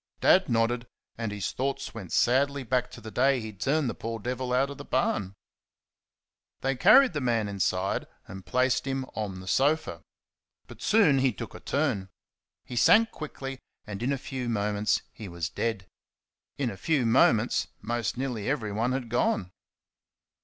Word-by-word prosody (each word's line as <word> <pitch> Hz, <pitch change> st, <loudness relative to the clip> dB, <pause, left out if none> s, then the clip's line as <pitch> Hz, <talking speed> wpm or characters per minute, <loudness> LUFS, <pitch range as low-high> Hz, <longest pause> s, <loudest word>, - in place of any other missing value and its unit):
Dad 185 Hz, -2 st, +4 dB
nodded, 120 Hz, +1 st, +1 dB, 0.3 s
and 115 Hz, -2 st, -3 dB
his 100 Hz, -2 st, -3 dB
thoughts 135 Hz, +1 st, -3 dB
went 100 Hz, -7 st, -8 dB
sadly 140 Hz, +3 st, +2 dB
back 125 Hz, 0 st, 0 dB
to -, -, -11 dB
the 110 Hz, 0 st, -8 dB
day 135 Hz, +2 st, +3 dB
he 110 Hz, -2 st, -7 dB
turned 140 Hz, +8 st, 0 dB
the -, -, -2 dB
poor 115 Hz, 0 st, -5 dB
devil 125 Hz, +3 st, -3 dB
out 135 Hz, +3 st, +2 dB
of 140 Hz, -, -9 dB
the -, -, -6 dB
barn. 100 Hz, -6 st, -1 dB, 1.3 s
They 135 Hz, 0 st, 0 dB
carried 265 Hz, -, +6 dB
the 150 Hz, -, -2 dB
man 115 Hz, -4 st, +1 dB
inside 95 Hz, -1 st, -1 dB, 0.2 s
and 95 Hz, 0 st, -9 dB
placed 130 Hz, +4 st, +1 dB
him 135 Hz, 0 st, -2 dB
on 100 Hz, -4 st, -4 dB
the 95 Hz, -, -12 dB
sofa. 145 Hz, -, +1 dB, 0.6 s
But -, -, -13 dB
soon 190 Hz, -11 st, +4 dB
he 130 Hz, -1 st, +3 dB
took 100 Hz, -, -8 dB
a -, -, -9 dB
turn. 130 Hz, -10 st, -1 dB, 0.6 s
He 125 Hz, -, -7 dB
sank 225 Hz, -, +5 dB
quickly, 135 Hz, -3 st, -7 dB, 0.3 s
and 105 Hz, -1 st, -6 dB
in 125 Hz, +3 st, 0 dB
a 140 Hz, -, 0 dB
few 130 Hz, -2 st, -5 dB
moments 105 Hz, -1 st, 0 dB
he 110 Hz, -, -8 dB
was 85 Hz, -2 st, -4 dB
dead. 105 Hz, -1 st, -2 dB, 0.7 s
In 130 Hz, -4 st, -1 dB
a 100 Hz, -, -9 dB
few 145 Hz, -2 st, +1 dB
moments 115 Hz, 0 st, +3 dB
more 120 Hz, +1 st, -2 dB
nearly 125 Hz, -4 st, -3 dB
everyone 115 Hz, -2 st, -1 dB
had 130 Hz, -2 st, -3 dB
gone. 110 Hz, -5 st, 0 dB
120 Hz, 165 wpm, -28 LUFS, 105-135 Hz, 1.3 s, carried